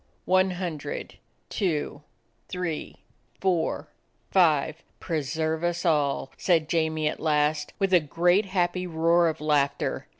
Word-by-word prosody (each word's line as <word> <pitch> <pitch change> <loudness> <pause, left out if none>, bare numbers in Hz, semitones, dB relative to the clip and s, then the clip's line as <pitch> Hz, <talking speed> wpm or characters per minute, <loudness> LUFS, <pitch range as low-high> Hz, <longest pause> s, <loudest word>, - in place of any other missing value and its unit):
"One 185 +1 +3
hundred, 180 - -5 0.3
two, 155 -7 -2 0.5
three, 180 -4 -4 0.4
four, 180 -4 0 0.4
five. 160 -3 +3 0.2
Pre 160 -3 -2
serve 160 +3 -2
us 175 +1 -1
all!" 145 -5 +1
said 165 -4 +2
Jamie 160 -1 0
at - - -3
last, 150 -1 +1
with 195 -1 0
a 180 - +8
great, 175 +6 +2
happy 180 -1 0
roar 170 +1 +3
of 160 - -2
laughter. 145 -2 0
165 Hz, 125 wpm, -26 LUFS, 155-180 Hz, 0.5 s, a